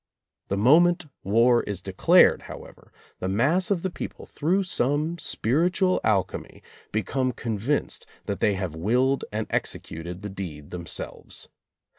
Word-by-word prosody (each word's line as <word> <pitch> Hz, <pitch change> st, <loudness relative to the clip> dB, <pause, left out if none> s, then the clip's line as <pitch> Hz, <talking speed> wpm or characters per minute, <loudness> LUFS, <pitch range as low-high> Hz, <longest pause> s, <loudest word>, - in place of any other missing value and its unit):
The 100 Hz, -, -1 dB
moment 170 Hz, -, +5 dB, 0.2 s
war 115 Hz, +5 st, +4 dB
is 100 Hz, -3 st, -3 dB
declared, 95 Hz, 0 st, +4 dB
however, -, -, -11 dB, 0.3 s
the 95 Hz, -, -2 dB
mass 145 Hz, -, +2 dB
of 190 Hz, -5 st, 0 dB
the 190 Hz, -, -1 dB
people, -, -, -7 dB
through 180 Hz, +6 st, 0 dB
some 155 Hz, 0 st, 0 dB
spiritual 175 Hz, -, +1 dB
alchemy, 100 Hz, -4 st, -1 dB, 0.3 s
be 110 Hz, 0 st, 0 dB
come 130 Hz, -1 st, 0 dB
convinced 115 Hz, +5 st, -1 dB, 0.2 s
that 100 Hz, -1 st, -3 dB
they 105 Hz, -, +2 dB
have 95 Hz, -4 st, -3 dB
willed 125 Hz, +11 st, +1 dB
and 110 Hz, +1 st, -2 dB
exe -, -, 0 dB
cuted 85 Hz, +3 st, -8 dB
the 105 Hz, -, -5 dB
deed 85 Hz, -7 st, -7 dB
themselves. 85 Hz, -1 st, -4 dB
115 Hz, 140 wpm, -25 LUFS, 95-155 Hz, 0.3 s, moment